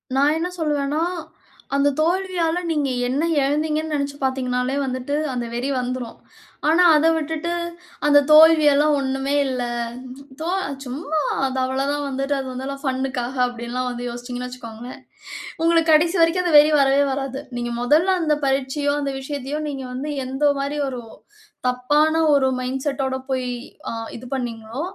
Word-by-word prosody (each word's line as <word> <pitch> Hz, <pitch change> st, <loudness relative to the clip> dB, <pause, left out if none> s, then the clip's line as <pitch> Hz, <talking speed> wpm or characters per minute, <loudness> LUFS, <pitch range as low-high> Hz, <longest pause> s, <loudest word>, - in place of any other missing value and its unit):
நான் 285 Hz, +3 st, +3 dB
என்ன 335 Hz, -, -1 dB
சொல்லுவேன்னா, 295 Hz, 0 st, 0 dB, 0.7 s
அந்த 280 Hz, +1 st, +3 dB
தோல்வியால 350 Hz, 0 st, +1 dB
நீங்க 295 Hz, -3 st, 0 dB, 0.2 s
என்ன 265 Hz, +4 st, 0 dB, 0.2 s
இழந்தீங்கன்னு 305 Hz, +2 st, 0 dB
நெனச்சு 280 Hz, -1 st, -2 dB
பார்த்தீங்கன்னாலே 255 Hz, 0 st, 0 dB
வந்துட்டு, 255 Hz, +1 st, -3 dB, 0.2 s
அந்த 245 Hz, -1 st, -2 dB
வெறி 245 Hz, +3 st, -2 dB
வந்துரும். 250 Hz, -1 st, -4 dB, 0.5 s
ஆனா, 335 Hz, +3 st, +5 dB
அத 300 Hz, +1 st, +3 dB
விட்டுட்டு, 320 Hz, +2 st, -2 dB, 0.5 s
அந்த 290 Hz, 0 st, +7 dB
தோல்வியெல்லாம் 305 Hz, -1 st, +7 dB
ஒண்ணுமே 270 Hz, +1 st, -1 dB
இல்ல. 255 Hz, -2 st, -2 dB, 0.8 s
"தோ 330 Hz, -, -2 dB, 0.4 s
சும்மா. 295 Hz, +5 st, -3 dB, 0.3 s
அது 265 Hz, 0 st, -4 dB
அவ்வளவு 265 Hz, +2 st, -1 dB
தான். 290 Hz, 0 st, -2 dB
வந்துட்டு 275 Hz, +1 st, -1 dB
அது 265 Hz, -, -5 dB
வந்து 265 Hz, +2 st, -5 dB
ஃபன்க்காக." 260 Hz, -1 st, -2 dB
அப்டில்லாம் 245 Hz, +1 st, -4 dB
வந்து 245 Hz, 0 st, -5 dB
யோசிச்சீங்கன்னு 245 Hz, +1 st, -6 dB
வச்சிக்கோங்களேன், 240 Hz, 0 st, -9 dB, 0.6 s
உங்களுக்கு 330 Hz, -1 st, +3 dB
கடைசி 335 Hz, +4 st, +4 dB
வரைக்கும், 330 Hz, +2 st, +3 dB
அந்த 335 Hz, -3 st, +3 dB
வெறி 300 Hz, +1 st, +5 dB
வரவே 275 Hz, +1 st, +4 dB
வராது. 270 Hz, 0 st, -3 dB, 0.2 s
நீங்க 240 Hz, 0 st, -3 dB
மொதல்ல 315 Hz, +9 st, +3 dB
அந்த 305 Hz, -2 st, +2 dB
பரீட்சையோ, 275 Hz, +2 st, 0 dB
அந்த 280 Hz, -1 st, -2 dB
விஷயத்தையோ, 280 Hz, +1 st, -4 dB
நீங்க 270 Hz, -2 st, -5 dB
வந்து, 270 Hz, +4 st, -4 dB, 0.2 s
எந்த 270 Hz, +3 st, +1 dB
மாரி 280 Hz, +2 st, -2 dB
ஒரு 250 Hz, -2 st, -6 dB, 0.7 s
தப்பான 295 Hz, +5 st, +2 dB, 0.2 s
ஒரு 270 Hz, -2 st, +3 dB
மைண்ட் 260 Hz, +1 st, -3 dB
செட்டோட 270 Hz, -1 st, -1 dB, 0.2 s
போய், 255 Hz, -1 st, -1 dB, 0.4 s
அ -, -, -3 dB, 0.3 s
இது 245 Hz, -, -11 dB
பண்ணினீங்களோ 235 Hz, 0 st, -5 dB
275 Hz, 145 wpm, -22 LUFS, 255-300 Hz, 0.8 s, அந்த